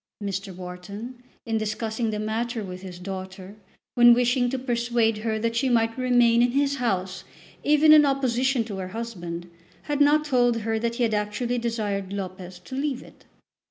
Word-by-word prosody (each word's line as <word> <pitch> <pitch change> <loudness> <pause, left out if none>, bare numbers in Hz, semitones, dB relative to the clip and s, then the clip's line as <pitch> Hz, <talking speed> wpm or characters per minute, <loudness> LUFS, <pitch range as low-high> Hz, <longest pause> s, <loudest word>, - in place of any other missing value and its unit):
Mr. 195 -1 -4
Wharton, 185 +7 -8 0.2
in 225 -2 0
discussing 220 +1 -2
the 215 - -2
matter 225 +2 -2
with 185 -1 -7
his 185 -2 -8
daughter, 190 +1 -7 0.4
when 240 -1 +7
wishing 245 0 +2
to 265 - -2
persuade 235 -3 0
her 220 0 -1
that 230 +1 -1
she 260 +3 +1
might 225 -1 +2
remain 245 -2 +3
in 245 0 +2
his 280 0 +1
house 190 -7 -2 0.4
even 300 +1 +6
in 305 -1 +8
opposition 265 -2 +1
to 210 -3 -6
her 185 -1 -4
husband, 175 -7 -6 0.4
had 295 -1 -1
not 300 +1 +4
told 245 -4 +2
her 225 +1 -1
that 235 +1 -2
he 245 - 0
had 225 -2 +1
actually 210 +4 -1
desired 210 -5 -2
Lopez 185 -2 -6
to 180 +8 -13
leave 275 -1 -2
it. - - -18
230 Hz, 175 wpm, -25 LUFS, 200-245 Hz, 0.4 s, in